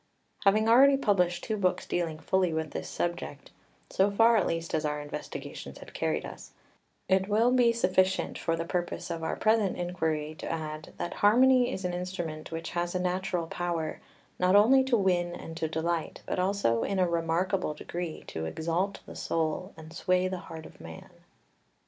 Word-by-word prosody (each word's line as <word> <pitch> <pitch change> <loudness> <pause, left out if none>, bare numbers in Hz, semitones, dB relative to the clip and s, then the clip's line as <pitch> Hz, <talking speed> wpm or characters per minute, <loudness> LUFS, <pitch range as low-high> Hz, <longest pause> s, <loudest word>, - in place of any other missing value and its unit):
Having 215 +3 +4
already 270 +4 +7
published 180 -8 +1
two 220 -2 -2
books 185 -3 0
dealing 165 -3 -2
fully 185 +2 +1
with 160 -1 -2
this 80 0 -5
subject 170 - -4 0.4
so 195 +2 +3
far 225 +3 +5
at 210 - +2
least 165 0 -3
as 155 - +1
our 150 -1 -1
investigations 145 0 -7
had - - -12
carried - - -1
us - - -10 0.5
it 190 0 +2
will 225 +4 +3
be 245 -2 +5
sufficient 190 -4 +1
for 165 - -1
the 165 0 -3
purpose 175 0 -3
of 165 - -4
our 160 - -2
present 215 -3 +2
inquiry 160 -4 -2
to - - -4
add 155 -1 -5
that 175 - -3
harmony 250 +4 +5
is 190 - -4
an 180 - -1
instrument 175 -4 -5
which 165 0 -5
has 175 +1 -2
a - - +1
natural 180 -1 -1
power, 165 -2 -3 0.4
not 180 +1 +4
only 250 +6 +6
to 260 -2 +2
win 175 -3 +1
and 165 - -8
to 160 - -1
delight, 160 +1 -2
but - - -2
also 185 - +1
in 195 - -1
a 185 -1 +3
remarkable 170 0 0
degree 170 +1 -5
to 80 0 -5
exalt 170 - -2
the - - -10
soul 165 +3 -2
and 160 0 -11
sway 185 +1 +1
the 185 -1 -4
heart 160 -3 -9
of - - -14
man. 80 0 -10
175 Hz, 180 wpm, -29 LUFS, 160-195 Hz, 0.5 s, already